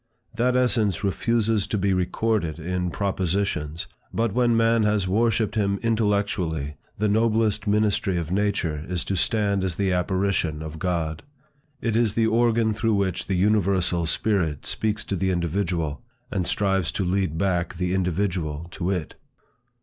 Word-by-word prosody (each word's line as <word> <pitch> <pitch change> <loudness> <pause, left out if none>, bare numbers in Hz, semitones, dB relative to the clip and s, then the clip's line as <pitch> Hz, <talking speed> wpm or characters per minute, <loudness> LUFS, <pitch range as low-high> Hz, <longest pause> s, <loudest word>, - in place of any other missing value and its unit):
That 125 +2 +1
essence 115 -6 +2
refuses 110 0 +1
to 105 - -1
be 100 0 +1
recorded 90 -2 0
in 90 +2 -2
propositions, 95 -4 -1 0.3
but 115 -3 0
when 120 -1 +3
man 115 0 +3
has 105 -3 +1
worshipped 110 +1 +1
him 100 -3 0
intellectually, 100 -9 0 0.2
the 105 - +1
noblest 110 0 +1
ministry 105 -3 +2
of 85 -1 -3
nature 95 -6 0
is 90 -2 -2
to 100 - -1
stand 100 +1 +1
as 90 -3 -1
the 95 0 +1
apparition 90 -4 0
of 80 0 -7
God. 80 -3 -1 0.6
It 115 -2 0
is 115 -3 +2
the 115 - +3
organ 115 -1 +2
through 110 0 +1
which 95 -3 -1
the 95 - 0
universal 95 -3 +2
spirit 80 -6 0
speaks 110 -1 -1
to 100 - -2
the 95 +1 0
individual, 85 -4 -1 0.3
and 90 -2 -1
strives 95 -3 +1
to 95 - -1
lead 90 -3 0
back 90 -1 0
the 90 +1 -1
individual 90 -4 -1
to 90 0 -3
it. 90 -5 -2
95 Hz, 150 wpm, -24 LUFS, 90-105 Hz, 0.6 s, when